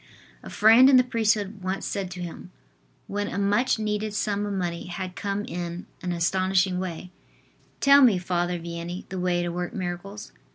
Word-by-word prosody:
A - - -10
friend 225 +5 +6
in 265 - +7
the 255 - +6
priesthood 215 -4 0
once 190 +1 -3
said 195 -3 -3
to 180 -1 -6
him, 175 +1 -8 0.6
when 205 0 -3
a 185 - -5
much 205 +6 +2
needed 210 -1 -2
sum 205 0 -1
of 205 - -3
money 175 -2 -3
had 180 +1 -6
come 200 +1 -3
in 175 0 -5 0.2
an 180 - -3
astonishing 185 +1 +1
way: 180 -1 -6 0.7
"Tell 280 0 +7
me, 235 -8 +6
Father 175 0 -1
Vianney, 170 +1 -6
the 190 - -4
way 180 -1 0
to 175 - -2
work 175 +5 -4
miracles." 190 +2 -6
190 Hz, 175 wpm, -25 LUFS, 175-205 Hz, 0.7 s, in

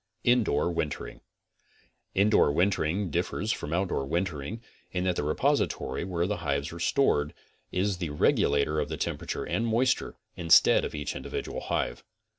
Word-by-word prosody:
INDOOR 110 -10 +2
WINTERING 80 -3 -4 0.9
Indoor 100 -6 +4
wintering 90 +2 +1
differs 90 +6 -1
from 75 - -4
outdoor 90 -3 0
wintering 85 +4 -2 0.3
in 90 -1 -1
that 90 -1 +1
the - - -1
repository 75 -3 0
where 85 -2 -1
the 105 +2 -1
hives 70 -1 -2
are 85 - -8
stored 85 - +1 0.4
is 95 +1 0
the 85 -3 -3
regulator 75 +1 +2
of - - -2
the - - -4
temperature - - -3
and 115 - -1
moisture, 120 +3 +1 0.2
instead 85 -3 +5
of - - -4
each 75 -1 -4
individual - - -5
hive. - - -2
85 Hz, 145 wpm, -28 LUFS, 75-100 Hz, 0.9 s, instead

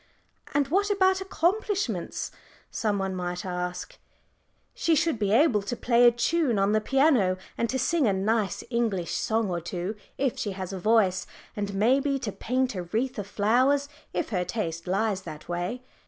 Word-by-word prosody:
"And 285 -1 +3
what 400 +6 +2
about 380 -1 +3
accomplishments?" 380 - -1 0.4
some 210 -3 0
one 195 -1 -2
might 180 0 -4
ask. 180 0 -4 0.7
"She 330 - +2
should 310 -5 +1
be 205 -2 +1
able 230 -2 +4
to 205 +5 -4
play 240 0 +4
a - - +7
tune 245 +1 +1
on 195 +1 +2
the 215 0 +2
piano, 260 -8 +3 0.2
and 235 - -1
to 260 - 0
sing 285 +1 +2
a - - +4
nice 205 +1 0
English 220 -7 0
song 220 -3 0
or 170 -1 -2
two 175 +5 -4 0.2
if 270 -3 0
she 205 - -2
has 190 0 -5
a 190 - -4
voice, 205 -2 +2 0.3
and 205 -2 -3
maybe 270 +7 +2
to 230 -6 -4
paint 255 +4 -1
a 185 - -3
wreath 225 +8 -2
of 200 - -5
flowers 255 +8 +2 0.2
if - - -2
her 180 -5 0
taste 170 -5 -4
lies 195 +1 0
that 155 -4 -9
way. 175 +9 -3
220 Hz, 175 wpm, -27 LUFS, 190-265 Hz, 0.7 s, a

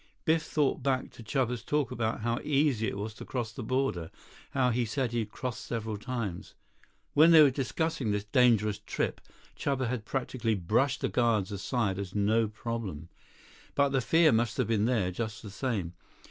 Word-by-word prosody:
Biff 160 0 +3
thought 150 -3 0
back 130 -1 0
to - - -13
Chuba's 125 0 -1
talk 145 +2 0
about 115 -3 -2
how 115 +1 0
easy 140 -6 +2
it - - -3
was 105 +2 -4
to - - -10
cross 120 -4 -3
the 125 - -7
border, 120 -9 -1 0.4
how 125 -2 +2
he 120 +1 +1
said 120 +2 -1
he'd 115 -3 -1
crossed 125 +1 -5
several 110 -2 -3
times. 105 -5 -5 0.6
When 155 +3 +7
they 160 -2 +9
were 140 - +5
discussing 135 -1 -1
this 105 -1 0
dangerous 105 -2 +3
trip, - - -3 0.3
Chuba 135 -3 -1
had 125 -3 -2
practically 120 -3 -1
brushed 110 +9 +1
the - - +1
guards 115 -6 +1
aside 100 -1 -1
as 100 -1 -6
no 110 +2 +2
problem. 105 -7 -5 0.7
But 140 0 +3
the 135 -1 +1
fear 160 +5 +4
must 115 0 +1
have - - +2
been 110 -2 +2
there, 110 -7 +1
just 110 +2 -5
the 105 - -8
same. 105 -7 -2
115 Hz, 180 wpm, -30 LUFS, 105-130 Hz, 0.7 s, they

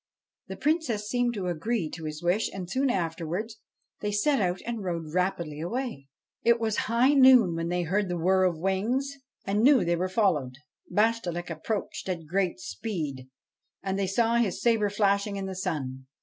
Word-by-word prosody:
The - - -7
Princess 290 -10 0
seemed 245 +1 0
to 195 -3 -3
agree 180 +3 -1
to 160 -2 -7
his 155 +1 -6
wish, 180 +6 +1
and, 185 -2 -6
soon 260 +8 0
afterwards, 175 +3 -2 0.4
they 210 - -2
set 240 +6 +2
out 180 -1 0
and 230 -3 -4
rode 165 -4 -4
rapidly 170 -4 -1
away. 225 - -4 0.3
It 235 0 +4
was 220 -2 0
high 245 +5 +4
noon 260 -9 +7
when 165 0 -2
they 175 0 0
heard 190 +3 0
the 175 - -1
whir 185 +3 +3
of 175 -3 +1
wings 215 - 0 0.3
and 205 +2 +1
knew 260 -5 +5
they 170 0 +2
were 185 +2 -1
followed. 175 - +1 0.4
Bashtchelik 180 -5 0
approached 190 +4 -4
at 175 -2 -2
a - - -15
great 180 -2 -1
speed, 135 - -5 0.5
and 195 0 -2
they 195 - 0
saw 230 +4 +2
his 225 -6 0
sabre 225 -3 +2
flashing 200 0 +1
in 195 -1 -3
the 190 - -4
sun. 135 -7 -4
195 Hz, 180 wpm, -27 LUFS, 170-225 Hz, 0.5 s, noon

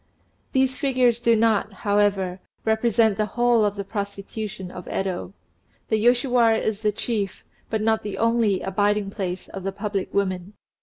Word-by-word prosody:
These 265 -1 +2
figures 255 -4 +2
do 235 -1 +4
not, 220 -2 +2
however, 200 -2 +1 0.3
represent 220 -1 +2
the 215 - +2
whole 240 -2 +4
of 205 -1 +1
the 200 - -4
prostitution 200 -1 -5
of 180 - -9
Yedo; 190 -1 -3 0.6
the 220 - +2
Yoshiwara 245 -2 +4
is 220 -1 -2
the 210 -1 +2
chief, 210 -2 -3 0.3
but 220 -1 -1
not 220 0 +2
the 205 - -5
only, 230 -4 +2
abiding 205 +1 0
place 185 -3 -4
of 195 - -7
the 195 +1 -2
public 200 -1 -3
women. 190 -1 -1
210 Hz, 155 wpm, -24 LUFS, 195-230 Hz, 0.6 s, do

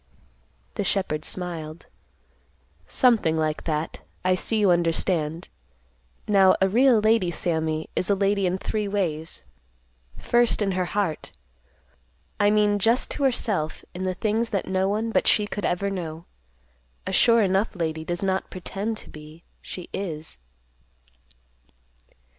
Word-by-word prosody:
The 205 - -2
shepherd 185 -6 -1
smiled, 170 -3 -5 1.0
"Something 225 - +3
like 155 -1 -1
that. 155 0 -3 0.2
I 185 - +4
see 220 +4 0
you 205 -3 +4
understand. 165 -1 0 0.8
Now 195 -2 +5
a 190 - +4
real 245 +4 +4
lady, 215 -4 +3
Sammy, 160 -2 -1
is 185 - 0
a 200 - +4
lady 195 0 +1
in 180 +1 0
three 210 +2 -2
ways: 170 -6 -2 0.7
First, 240 0 +2
in 200 -2 +1
her 185 -1 0
heart; 180 -4 -2 1.1
I 205 0 +4
mean 210 -1 +3
just 230 +5 +2
to 285 - -2
herself, 205 - -1
in 180 - -6
the 185 -1 -1
things 225 +3 0
that 200 -3 -2
no 190 0 +1
one 220 +3 -1
but - - +1
she 210 - +4
could 205 -1 -4
ever 200 +3 0
know. 165 -3 -5 0.8
A 190 - -3
'sure 230 +3 +5
enough' 195 +3 +1
lady 160 -2 -2
does 175 +3 -3
not 190 0 -1
pretend 200 +4 -4
to - - -9
be; 155 +2 -13 0.2
she 180 - -8
_is." 160 - -5
190 Hz, 140 wpm, -25 LUFS, 165-210 Hz, 1.1 s, Now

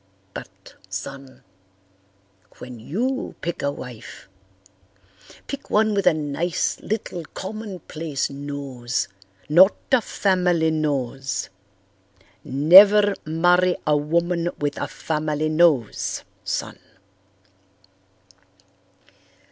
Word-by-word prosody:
But, - - -11 0.2
son, 130 +8 -8 1.1
when 125 -2 -9
you 240 - -3
pick 170 0 -4
a 140 - 0
wife 125 -6 -10 1.2
pick 280 0 -7
one 215 0 +3
with 200 -1 +1
a - - +7
nice 155 +3 -2
little 200 -5 -4
commonplace 185 -8 -4
nose, 140 -3 -4 0.4
not 185 +6 +6 0.2
a 260 -2 +5
family 180 -6 +1
nose. 135 -4 -2 0.9
Never 195 +9 +7
marry 175 +3 +3
a 150 -1 +3
woman 170 +3 0
with 145 -1 -3
a - - -1
family 155 -1 -2
nose, 155 -8 +2 0.2
son." - - -4
160 Hz, 85 wpm, -23 LUFS, 140-185 Hz, 1.2 s, a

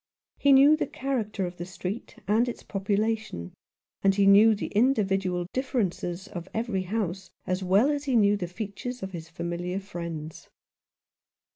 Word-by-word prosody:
He 280 - +4
knew 275 +3 +8
the 310 - -2
character 225 -9 -2
of 175 0 -7
the 175 - -5
street 190 +3 -6
and 225 +4 +3
its - - -7
population, 200 - -2 0.5
and 195 0 +3
he 200 0 +3
knew 210 +3 +7
the - - -4
individual 195 -6 +1
differences 200 -8 -2
of 175 -3 -7
every 225 -4 -1
house, 190 -1 -3 0.2
as 185 +1 -1
well 200 +10 +4
as 290 0 -2
he 265 -3 +1
knew 205 -2 +5
the 185 -4 -3
features 215 +7 -6
of 190 - -5
his 165 -3 -8
familiar 175 +2 -3
friends. 170 -5 -7
200 Hz, 155 wpm, -27 LUFS, 180-225 Hz, 0.5 s, knew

